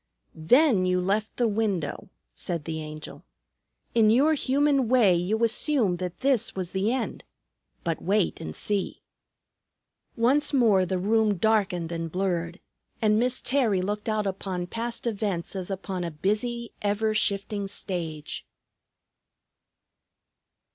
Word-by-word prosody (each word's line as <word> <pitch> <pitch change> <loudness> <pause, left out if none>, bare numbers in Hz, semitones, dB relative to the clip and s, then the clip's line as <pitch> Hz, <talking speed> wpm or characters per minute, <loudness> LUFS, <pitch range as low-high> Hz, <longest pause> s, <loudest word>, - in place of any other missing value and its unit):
"Then 205 - +4
you 180 0 +2
left 205 +4 -1
the 240 - +2
window," 200 -9 -2 0.2
said 170 -5 -4
the 160 -1 -4
Angel. 155 0 -9 0.7
"In 225 -2 +5
your 275 +8 +4
human 280 -2 +2
way 240 -7 +5
you 190 +6 0
assumed 230 - +1
that 180 -1 -5
this 265 -4 +1
was 185 -2 -4
the 195 +4 0
end. 255 -2 -3 0.6
But 165 -2 -2
wait 195 0 +1
and 80 - -6
see." 205 -2 -3 1.1
Once 265 +6 +3
more 210 -8 +4
the 185 - -1
room 210 +1 +2
darkened 185 -5 +1
and 165 -1 -4
blurred, 175 -2 -2 0.4
and 215 -1 +3
Miss 250 +1 +2
Terry 230 -9 +1
looked 210 +3 -3
out 215 -1 0
upon 190 -2 -3
past 235 +5 -3
events 200 -6 -2
as 185 -1 -4
upon 190 -1 -4
a 170 - -2
busy, 215 +8 -2
ever 210 +1 0
shifting 200 -1 0
stage. 170 -6 -4
205 Hz, 130 wpm, -26 LUFS, 180-230 Hz, 1.1 s, In